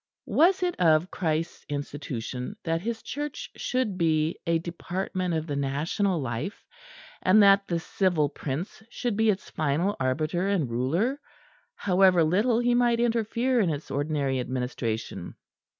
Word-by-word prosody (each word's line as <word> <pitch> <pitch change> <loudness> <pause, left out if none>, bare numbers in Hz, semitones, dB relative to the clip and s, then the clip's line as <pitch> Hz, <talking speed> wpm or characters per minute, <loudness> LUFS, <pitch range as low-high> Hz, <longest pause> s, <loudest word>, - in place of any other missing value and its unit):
Was 365 +3 +3
it 355 -1 0
of 165 0 +4
Christ's 165 -1 -2
institution 140 - -4
that 165 -1 -1
His 225 +2 -4
Church 295 -1 -5
should 245 -7 -1
be 160 -1 +1
a 170 0 +3
department 175 +1 -3
of 160 -1 -1
the 145 -3 -3
National 155 +7 0
Life; 130 - -4 0.6
and 205 +3 +6
that 200 0 +5
the 170 -1 0
civil 165 -3 +1
prince 150 +8 -5
should 240 -2 -2
be 220 +1 +3
its 195 -2 -1
final 160 +6 0
arbiter 155 +8 0
and 175 -11 0
ruler, 170 - 0 0.5
however 185 -2 +4
little 210 +9 +2
he 240 0 +2
might 240 -1 +3
interfere 235 +2 +1
in 195 -6 +3
its 150 -1 -4
ordinary 140 -2 0
administration? 125 -3 -3
175 Hz, 140 wpm, -27 LUFS, 145-210 Hz, 0.6 s, and